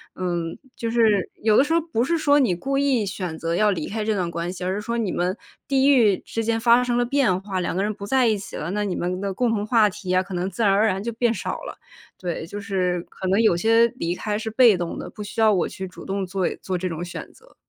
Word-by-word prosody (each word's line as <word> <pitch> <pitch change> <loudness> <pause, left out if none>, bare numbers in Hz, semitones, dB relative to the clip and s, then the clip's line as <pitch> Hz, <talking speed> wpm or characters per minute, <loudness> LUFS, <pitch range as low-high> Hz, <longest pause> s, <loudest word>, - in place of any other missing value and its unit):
嗯， 175 -2 -3 0.2
就 230 - -3
是 220 -5 +3
有 215 -1 +4
的 - - +6
时 305 +3 -1
候 335 - +4
不 300 -8 -1
是 335 +6 +1
说 290 -2 +4
你 245 -10 +3
故 275 +10 -2
意 270 -6 +2
选 180 -4 -4
择 165 +1 -2
要 210 +3 +3
离 165 -6 -3
开 220 +1 -3
这 220 - +1
段 180 -3 -1
关 170 +1 -3
系， 185 - -7
而 185 +1 -1
是 205 - -3
说 235 +2 -3
你 215 -5 -1
们 180 +2 -1 0.3
地 270 0 +3
域 225 -9 +5
之 225 - -4
间 225 0 0
发 235 +1 +5
生 240 -1 0
了 245 - +2
变 245 -8 +2
化， 195 -2 -3
两 175 - -2
个 190 - 0
人 210 - 0
不 200 -1 -8
在 260 +2 +3
一 215 -2 +2
起 195 - -9
了， 155 - -4
那 210 +1 -1
你 195 -3 -2
们 180 +1 -2
的 200 -1 -2
共 245 +5 0
同 210 -2 -1
话 215 -2 +4
题 205 -1 -9
呀， 185 0 +3
可 190 - -9
能 180 +2 -1
自 195 - -5
然 200 - +4
而 200 +3 +3
然 190 -2 -1
就 235 - -2
变 235 0 +1
少 - - -4
了。 - - -8 0.4
对， 175 -3 -4
就 205 +5 -7
是 185 -4 -1
可 190 - -6
能 195 +3 +2
有 220 -6 +4
些 225 +5 +4
离 170 -4 -2
开 210 +2 -2
是 220 0 -4
被 225 -1 +5
动 175 -1 -4
的， - - -6
不 210 - -10
需 210 +3 -7
要 220 -1 +5
我 180 - +1
去 190 - -6
主 180 - -12
动 195 0 -2
做 185 0 -1
做 185 -1 -2
这 185 +1 -3
种 165 0 -4
选 175 - -7
择。 - - -22
205 Hz, 300 characters per minute, -23 LUFS, 185-230 Hz, 0.4 s, 的